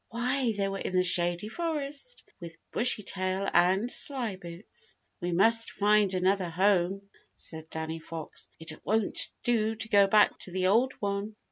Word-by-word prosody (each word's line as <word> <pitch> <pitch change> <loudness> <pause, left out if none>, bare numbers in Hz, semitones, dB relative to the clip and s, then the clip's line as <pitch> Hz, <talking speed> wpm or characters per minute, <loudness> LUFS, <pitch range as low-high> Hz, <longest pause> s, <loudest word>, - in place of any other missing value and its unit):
Why, 245 +1 0
they 200 -1 0
were 195 0 -4
in 185 - -4
the 180 - +4
Shady 175 +1 +2
Forest 305 - -4 0.2
with 165 -1 -9
Bushytail 195 -4 +1
and 185 +6 +3
Slyboots. 225 - -3 0.2
"We 175 -1 -3
must 225 +6 +3
find 205 -2 +2
another 185 0 +1
home," 190 +2 +1 0.3
said 160 -1 -8
Danny 160 0 -4
Fox. 160 -1 -7
"It 160 -1 -9
won't 220 -1 0
do 225 -2 +1
to 220 0 -7
go 200 -1 +5
back 210 +1 +4
to 185 - -4
the 185 +1 -1
old 235 +7 +3
one." 200 +1 -3
200 Hz, 150 wpm, -29 LUFS, 180-225 Hz, 0.3 s, go